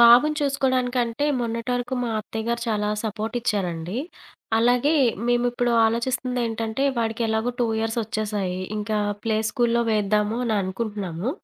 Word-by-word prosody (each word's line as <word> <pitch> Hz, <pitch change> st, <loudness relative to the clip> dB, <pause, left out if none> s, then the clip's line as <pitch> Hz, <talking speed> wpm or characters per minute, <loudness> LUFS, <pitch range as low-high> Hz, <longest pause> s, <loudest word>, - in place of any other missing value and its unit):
బాబుని 240 Hz, +6 st, +7 dB
చూసుకోడానికంటే, 255 Hz, -2 st, +1 dB, 0.2 s
మొన్నటి 230 Hz, +1 st, -2 dB
వరకు 245 Hz, +1 st, -2 dB
మా 240 Hz, -, -1 dB
అత్తయ్య 220 Hz, +1 st, -5 dB
గారు 235 Hz, 0 st, 0 dB
చాలా 210 Hz, -1 st, 0 dB, 0.2 s
సపోర్టిచ్చారండి. 210 Hz, -5 st, -2 dB, 0.6 s
అలాగే 245 Hz, +6 st, +3 dB, 0.3 s
మేము 240 Hz, 0 st, +3 dB
ఇప్పుడు 245 Hz, 0 st, +1 dB
ఆలోచిస్తుందేంటంటే, 235 Hz, 0 st, -1 dB
వాడికెలాగో 225 Hz, +1 st, 0 dB
2 240 Hz, -, +3 dB
ఇయర్సొచ్చేసాయి, 215 Hz, -4 st, -2 dB, 0.2 s
ఇంకా 210 Hz, 0 st, -1 dB, 0.3 s
ప్లే 220 Hz, -1 st, +1 dB
స్కూలుల్లో 235 Hz, -2 st, +2 dB
వేద్దాము 210 Hz, +1 st, +1 dB
అని 225 Hz, -2 st, +1 dB
అనుకుంటున్నాము. 195 Hz, 0 st, -3 dB
230 Hz, 115 wpm, -24 LUFS, 215-245 Hz, 0.6 s, బాబుని